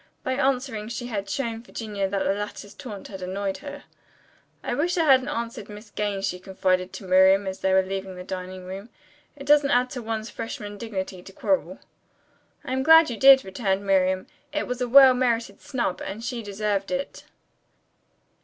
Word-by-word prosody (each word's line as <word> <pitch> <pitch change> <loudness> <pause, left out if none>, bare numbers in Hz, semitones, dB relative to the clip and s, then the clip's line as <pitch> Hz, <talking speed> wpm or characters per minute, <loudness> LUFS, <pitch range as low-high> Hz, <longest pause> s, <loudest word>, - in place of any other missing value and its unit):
By 260 - -1
answering 260 -5 -1
she 240 +1 -5
had 200 -5 -4
shown 230 -5 -2
Virginia 210 -5 -4
that 195 0 -1
the - - +1
latter's 205 0 -6
taunt 210 -6 -9
had 190 -2 -8
annoyed 190 +1 -3
her. 285 0 -9 0.8
"I - - -2
wish 345 +5 0
I 330 - +3
hadn't 265 -2 +5
answered 235 -7 -4
Miss 210 +1 -11
Gaines," 200 -2 -2
she 180 -1 -4
confided 185 -1 0
to - - -8
Miriam 190 +1 +5
as 190 0 -4
they 190 - +1
were 190 0 +4
leaving 190 0 -5
the 180 - -8
dining 185 0 -6
room. 195 +4 -8 0.5
"It 275 -1 -10
doesn't 290 -1 +5
add 250 -2 +2
to 250 - -5
one's 220 -1 -4
freshman 205 -2 -6
dignity 190 -5 -5
to 195 - -12
quarrel." 285 +8 -1 0.9
"I 255 - -3
am 265 - 0
glad 320 0 +7
you 230 - -4
did," 270 +1 +7
returned 190 0 -1
Miriam. 190 -1 +2 0.3
"It 300 0 -1
was 250 0 -4
a 245 - -1
well 265 0 +9
merited 235 -5 -1
snub, 245 -9 -2
and 205 +4 -6
she 240 -1 -3
deserved 205 -1 -2
it." 275 +1 -4
210 Hz, 185 wpm, -25 LUFS, 195-255 Hz, 0.9 s, well